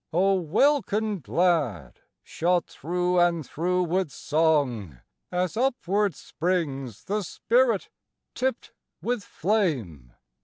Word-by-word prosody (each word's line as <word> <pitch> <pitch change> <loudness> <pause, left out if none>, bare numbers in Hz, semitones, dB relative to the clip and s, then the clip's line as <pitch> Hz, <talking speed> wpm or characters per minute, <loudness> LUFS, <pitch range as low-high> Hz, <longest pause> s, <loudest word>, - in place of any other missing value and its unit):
O 190 +4 +3
welkin 215 - +1
glad, 150 - 0 0.2
shot 175 +1 0
through 180 +3 -1
and 170 -3 +2
through 180 +6 0
with 180 0 0
song, 140 - 0 0.3
As 180 +2 -1
upward 210 - +1
springs 145 - -3
the 210 +2 -1
spirit 230 +3 +1 0.5
tipt 260 -1 -2 0.3
with 240 -3 -1
flame! 135 - -1
180 Hz, 100 wpm, -26 LUFS, 150-205 Hz, 0.5 s, O